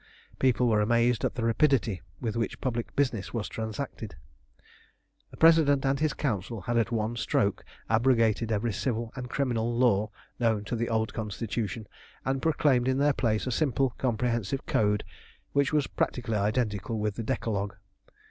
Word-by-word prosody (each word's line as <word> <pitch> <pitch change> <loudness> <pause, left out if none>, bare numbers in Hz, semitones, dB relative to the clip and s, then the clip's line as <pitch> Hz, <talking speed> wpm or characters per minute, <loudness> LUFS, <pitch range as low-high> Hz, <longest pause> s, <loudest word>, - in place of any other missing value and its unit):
People 125 -1 +3
were 110 -2 +3
amazed 120 +2 +2
at - - 0
the 120 - -2
rapidity 115 -5 +2 0.2
with 115 -2 -3
which 115 -3 -2
public 120 -3 -3
business 125 -7 -1
was 110 -2 -2
transacted. 110 0 -5 1.1
The - - -14
President 155 -4 +5
and 135 0 +1
his 155 -2 +1
Council 110 -4 -2
had 120 +6 -2
at 115 0 +2
one 115 0 -1
stroke 100 -3 0 0.2
abrogated 115 -1 +2
every 110 +1 0
civil 115 +1 -2
and 125 -1 -6
criminal 120 -4 -1
law 110 -4 +3 0.3
known 110 -3 +1
to 120 - -2
the 115 +1 -1
old 110 -1 0
Constitution, 110 +1 -3 0.4
and 135 0 0
proclaimed 145 -6 +2
in 130 0 +2
their 145 +1 +3
place 110 -5 0
a 130 - -2
simple, 135 -1 +1
comprehensive 120 0 -1
code 105 -8 +1 0.5
which 140 -1 +2
was 150 -2 +2
practically 120 -3 -2
identical 105 +1 0
with 105 -1 -1
the 115 - -5
Decalogue. 105 -5 -2
115 Hz, 155 wpm, -28 LUFS, 110-130 Hz, 1.1 s, President